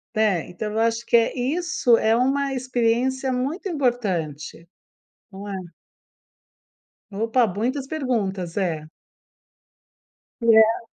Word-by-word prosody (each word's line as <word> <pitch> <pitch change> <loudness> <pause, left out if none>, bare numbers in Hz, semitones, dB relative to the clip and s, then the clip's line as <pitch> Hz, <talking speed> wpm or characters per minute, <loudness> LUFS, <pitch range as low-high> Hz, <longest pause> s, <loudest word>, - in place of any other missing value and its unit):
né, 210 -6 +1
então 210 +4 -5
eu 220 - -1
acho 230 +1 0
que 235 - +2
é 230 +3 +3
isso 300 -1 +2
é 220 0 +2
uma 270 +3 +1
experiência 255 +1 0
muito 275 +10 -2
importante, 185 - -2 0.6
não 200 +1 -9
é? 200 - -4 1.6
Opa, 225 +4 +2
muitas 245 +8 -2
perguntas, 205 - -2
é. 165 -6 -1 1.6
E - - -3
é 220 +1 +4
230 Hz, 110 wpm, -23 LUFS, 205-260 Hz, 1.6 s, é